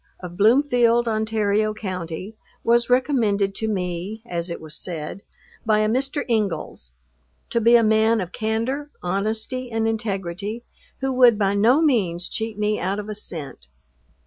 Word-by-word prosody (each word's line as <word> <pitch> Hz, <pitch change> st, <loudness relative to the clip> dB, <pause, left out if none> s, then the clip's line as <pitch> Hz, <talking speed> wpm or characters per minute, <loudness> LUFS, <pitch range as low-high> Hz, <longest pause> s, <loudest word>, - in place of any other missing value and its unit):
of 175 Hz, -1 st, -8 dB
Bloomfield, 240 Hz, +2 st, +4 dB
Ontario 215 Hz, -1 st, 0 dB
county, 185 Hz, 0 st, -5 dB, 0.3 s
was 235 Hz, +1 st, +3 dB
recommended 225 Hz, -7 st, +2 dB
to 220 Hz, -, -3 dB
me 190 Hz, +2 st, -3 dB
(as 170 Hz, -4 st, -4 dB
it 170 Hz, -, -5 dB
was 155 Hz, 0 st, -9 dB
said) 170 Hz, +1 st, -6 dB, 0.4 s
by 215 Hz, -1 st, +3 dB
a 215 Hz, -, +2 dB
Mr. 270 Hz, +5 st, 0 dB
Ingles, 200 Hz, -, -2 dB, 0.6 s
to 235 Hz, -, +1 dB
be 235 Hz, +2 st, +6 dB
a 235 Hz, -, +6 dB
man 220 Hz, +1 st, +3 dB
of 180 Hz, -3 st, -4 dB
candor, 230 Hz, +8 st, -2 dB
honesty 220 Hz, +7 st, -2 dB
and 225 Hz, 0 st, 0 dB
integrity, 210 Hz, 0 st, -3 dB, 0.4 s
who 270 Hz, 0 st, 0 dB
would 245 Hz, -3 st, +6 dB
by 200 Hz, -1 st, +1 dB
no 235 Hz, +10 st, +4 dB
means 185 Hz, -, +1 dB
cheat 220 Hz, -1 st, -4 dB
me 210 Hz, 0 st, 0 dB
out 190 Hz, +3 st, -1 dB
of 210 Hz, 0 st, -6 dB
a -, -, -3 dB
cent. 155 Hz, -, -6 dB
215 Hz, 150 wpm, -23 LUFS, 190-235 Hz, 0.6 s, be